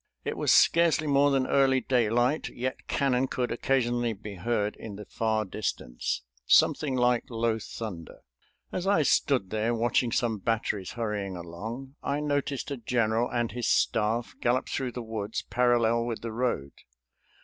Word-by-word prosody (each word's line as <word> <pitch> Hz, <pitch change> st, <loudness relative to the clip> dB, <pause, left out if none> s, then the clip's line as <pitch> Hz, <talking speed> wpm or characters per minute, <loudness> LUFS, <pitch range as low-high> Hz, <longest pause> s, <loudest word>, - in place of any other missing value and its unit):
It -, -, -2 dB
was -, -, +1 dB
scarcely 165 Hz, -2 st, +5 dB
more 145 Hz, 0 st, +4 dB
than 135 Hz, -2 st, +2 dB
early 135 Hz, -1 st, +3 dB
daylight, 120 Hz, +4 st, +1 dB
yet 130 Hz, +2 st, -5 dB
cannon 135 Hz, -1 st, +1 dB
could 125 Hz, -1 st, -2 dB
occasionally 120 Hz, -1 st, +1 dB
be 105 Hz, 0 st, -9 dB
heard 105 Hz, +2 st, -1 dB
in 105 Hz, -3 st, -8 dB
the 105 Hz, +1 st, -9 dB
far 110 Hz, 0 st, -1 dB
distance, 90 Hz, -, -3 dB, 0.2 s
something 140 Hz, -4 st, +4 dB
like 125 Hz, -1 st, +2 dB
low 115 Hz, -1 st, 0 dB
thunder. 105 Hz, -6 st, -7 dB, 0.5 s
As 185 Hz, +1 st, -3 dB
I 200 Hz, -6 st, +4 dB
stood 130 Hz, -8 st, +2 dB
there 110 Hz, +2 st, 0 dB
watching 120 Hz, +1 st, +1 dB
some 115 Hz, -2 st, 0 dB
batteries 105 Hz, -2 st, -1 dB
hurrying 105 Hz, -5 st, -3 dB
along 110 Hz, -, -7 dB
I 140 Hz, +1 st, -1 dB
noticed 145 Hz, -1 st, -2 dB
a 140 Hz, -, -2 dB
general 115 Hz, 0 st, 0 dB
and 120 Hz, -1 st, -1 dB
his 120 Hz, -1 st, -3 dB
staff 115 Hz, +2 st, +1 dB
gallop 125 Hz, +2 st, +1 dB
through 130 Hz, -3 st, -2 dB
the 125 Hz, -, -5 dB
woods, 110 Hz, -1 st, -4 dB
parallel 120 Hz, -2 st, +3 dB
with 115 Hz, -2 st, -4 dB
the 115 Hz, -, -4 dB
road. 110 Hz, -, -1 dB
120 Hz, 155 wpm, -28 LUFS, 110-130 Hz, 0.5 s, scarcely